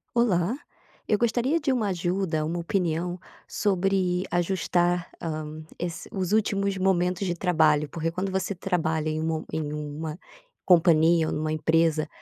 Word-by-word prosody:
Olá, 210 -3 +2 0.5
eu 210 - +3
gostaria 240 +8 +1
de 285 -3 +1
uma 230 -5 0
ajuda, 175 -3 -1
uma 170 +2 -2
opinião 175 -1 -1 0.3
sobre 190 -2 +1
ajustar, 175 0 +1
hã, 155 -1 -5 0.2
es 175 -1 -4
os 190 -2 -2
últimos 200 -2 +1
momentos 185 0 +1
de 175 - 0
trabalho, 155 -4 +2
porque 165 0 -2
quando 185 +3 -3
você 190 +1 -1
trabalha 160 -4 -1
em 155 0 -2
um 160 0 -1
em 150 -1 -3
uma 150 +2 -5 0.5
companhia 165 -2 +5
ou - - -2
numa 155 0 -1
empresa, 160 0 +2
175 Hz, 140 wpm, -26 LUFS, 160-190 Hz, 0.5 s, companhia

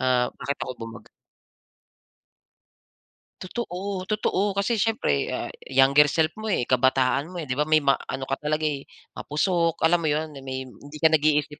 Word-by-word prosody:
ah, 125 -1 +2
bakit 140 +2 -3
ako - - -3
bumag 115 0 -11 2.4
Totoo, 190 -2 -5
totoo 205 -1 0
kasi 205 +3 0
siyempre, 200 - +1
ah, - - -4 0.2
younger 135 +2 +5
self 160 +1 +1
mo, 220 - -5
eh, 195 - +1
kabataan 130 +3 +2
mo, 180 - -12
eh, 170 - -4
'di 130 -4 -3
ba 150 - +1
may 155 -1 +4
ma 140 - +5 0.2
ano 135 0 -4
ka 135 +1 -3
talaga, 155 +1 -1
eh, 145 -3 -2 0.2
mapusok. 165 +2 -1
Alam 170 +2 +4
mo 165 - -2
'yon, 155 +1 0
na 140 - -10
may 130 -1 -5
hindi 145 +3 -12
ka 160 - +6
nag-iisip 150 -1 +2
150 Hz, 170 wpm, -25 LUFS, 135-175 Hz, 2.4 s, ka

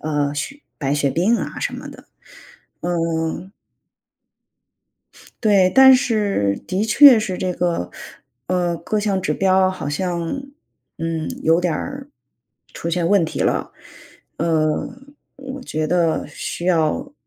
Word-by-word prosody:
呃， 145 -2 -1
血 275 - -5 0.2
白 140 -2 -1
血 145 -1 +1
病 190 - +2
啊 - - -5
什 - - -2
么 - - -8
的， - - -13 0.8
嗯。 165 +1 -2 1.9
对， 200 -4 +4
但 265 0 +9
是， 205 - +1
的 190 +4 0
确 260 +2 +8
是 200 -4 -3
这 185 0 -2
个 170 - -1 0.6
呃， 175 -1 0
各 210 +6 -2
项 200 -2 0
指 150 -3 -1
标 190 0 +3
好 185 -6 -5
像， 170 - -2 0.6
嗯， 165 -1 -3
有 165 +2 +3
点 175 -3 0
儿 275 - -6 0.6
出 170 - -5
现 170 0 0
问 200 -3 +4
题 160 - -5
了。 - - 0 0.6
呃， 155 -2 0 0.5
我 270 0 -8
觉 155 -10 -3
得 165 0 +1
需 170 +3 -6
要 170 - +1
175 Hz, 140 characters per minute, -20 LUFS, 160-205 Hz, 1.9 s, 但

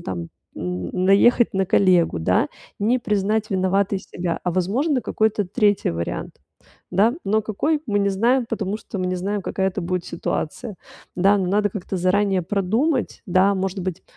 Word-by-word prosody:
там, 85 -3 -5 0.3
не 90 0 -4
наехать 200 +6 +4
на 190 -1 0
коллегу, 180 - +3
да, 80 - +1 0.3
не 230 +5 +2
признать 215 0 0
виноватой 195 +1 +1
себя, 175 -2 -4
а, 180 - -1
возможно, 235 - 0
какой-то 215 -1 0
третий 205 - +1
вариант, 85 0 -5 0.5
да? 210 +7 +3
Но 215 +2 +1
какой, 290 +9 -1
мы 205 -2 +1
не 200 0 +2
знаем, 235 +5 +2
потому 210 -3 -2
что 200 - -7
мы 185 - -1
не 185 0 -1
знаем, 200 +2 -2
какая 190 0 -1
это 190 +1 -4
будет 180 0 -2
ситуация. 185 +5 -4 0.4
Да, 195 +3 +4
ну, 185 - -1
надо 205 +2 +2
как-то 190 -1 -5
заранее 190 +1 +2
продумать, 220 - 0
да, 190 +2 +3
может 190 0 -2
быть, 180 -2 -4
195 Hz, 165 wpm, -22 LUFS, 185-215 Hz, 0.5 s, наехать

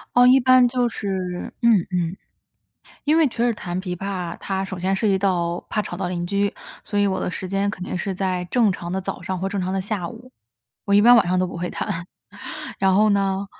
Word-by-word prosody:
哦， 245 0 +7
一 260 +1 +6
般 255 -1 +6
就 245 -1 +1
是 185 -4 -4
嗯 230 -4 +5
嗯。 175 0 -1 0.9
因 305 +2 +3
为 320 - +5
确 235 -1 -1
实 240 - +3
弹 180 -2 -4
琵 180 -2 -4
琶， 185 -3 -4
它 195 0 -2
首 190 -1 -6
先 190 +2 0
涉 215 +3 0
及 190 -1 +3
到 175 -3 0
怕 210 - 0
吵 175 - -6
到 185 - -2
邻 175 -1 -3
居， 200 +1 0 0.3
所 205 - -2
以 205 - +4
我 190 - 0
的 - - -2
时 185 0 -5
间 195 +1 0
肯 185 -3 -5
定 185 - -4
是 190 +1 -3
在 185 -1 -1
正 220 +2 +2
常 175 -1 -5
的 190 - -1
早 - - -5
上 185 -1 -3
或 195 - -1
正 200 -1 -2
常 185 +1 -2
的 195 - 0
下 190 -3 -3
午， 245 +2 -12 0.5
我 200 - +1
一 205 - +7
般 240 +1 +8
晚 200 - +4
上 185 +1 +1
都 185 - +2
不 170 - -7
会 175 +1 -3
弹。 180 -4 -4 0.7
然 190 -1 +3
后 215 +2 +5
呢， 195 -1 +1
195 Hz, 255 characters per minute, -22 LUFS, 180-210 Hz, 0.9 s, 般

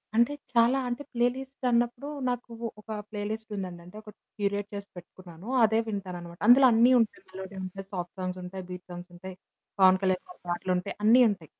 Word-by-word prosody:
అంటే 235 +5 +4 0.2
చాలా 235 +2 +5
అంటే 245 +4 -3
ప్లే 240 0 +3
లిస్ట్ 265 0 -8
అన్నప్పుడు 240 +3 +1 0.2
నాకు 245 -1 -4 0.3
ఒక - - -39 0.2
ప్లే 210 -1 -5
లిస్ట్ 220 0 -6
ఉందండి. 180 -3 -5
అంటే 180 +4 -12
ఒకటి 210 -1 -14 0.2
క్యూరేట్ 205 0 -1
చేసి 200 0 -7
పెట్టుకున్నాను. 175 +1 -12 0.2
అదే 220 0 +4
వింటాననమాట. 180 -4 -6
అందులో 260 +3 +8
అన్నీ 235 +3 +6
ఉంటాయి 225 -2 -1
మెలోడీ 190 +1 -8
ఉంటయి, 190 +1 -7
సాఫ్ట్ 175 -2 -5
సాంగ్స్ 185 0 -3
ఉంటయి, 185 +1 -7
బీట్ 180 0 -8
సాంగ్స్ 175 +1 -9
ఉంటయి. 185 +1 -9 0.4
'పవన్ 190 0 +7
కళ్యాణ్' 185 -1 +1
గారి 360 - -14
పాటలుంటయి 180 +1 -1
అన్నీ 235 +4 +7
ఉంటయి. 185 -6 -7
200 Hz, 180 wpm, -28 LUFS, 180-235 Hz, 0.4 s, అందులో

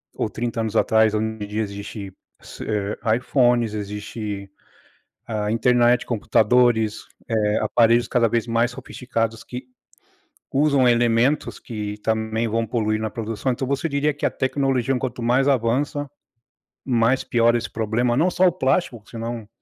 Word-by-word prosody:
ou - - -1
30 115 0 -3
anos 110 0 -3
atrás, 110 -1 +3
onde 105 -1 -3
existe, 100 -1 -5 0.3
ce - - -9
eh, 105 -1 -2 0.2
iPhones, 120 -4 +2
existe 105 -1 -5 0.8
a 105 -2 -2
internet, 120 +1 +3
computadores, 110 0 +2 0.2
eh, 105 -2 +1
aparelhos 115 +2 +3
cada 120 -2 +2
vez 115 +1 0
mais 115 +1 +1
sofisticados 115 -3 -4
que 125 +2 -7 0.9
usam 140 -3 +3
elementos 120 +4 +2
que 105 -3 -5
também 110 +1 -1
vão 115 +1 0
poluir 110 -1 -1
na 110 -1 -2
produção. 115 +3 -3
Então 130 +2 -3
você 140 +4 -1
diria 140 0 0
que 145 - -6
a - - +1
tecnologia, 135 -1 0
quanto 125 -1 -4
mais 125 +4 +2
avança, 140 +3 0 0.8
mais 125 0 +2
piora 120 0 +3
esse 115 -2 -4
problema, 120 +3 0
não 175 +5 +3
só 185 +1 +4
o - - +4
plástico 135 - 0
que - - -21
senão 115 -1 -5
115 Hz, 145 wpm, -22 LUFS, 110-125 Hz, 0.9 s, só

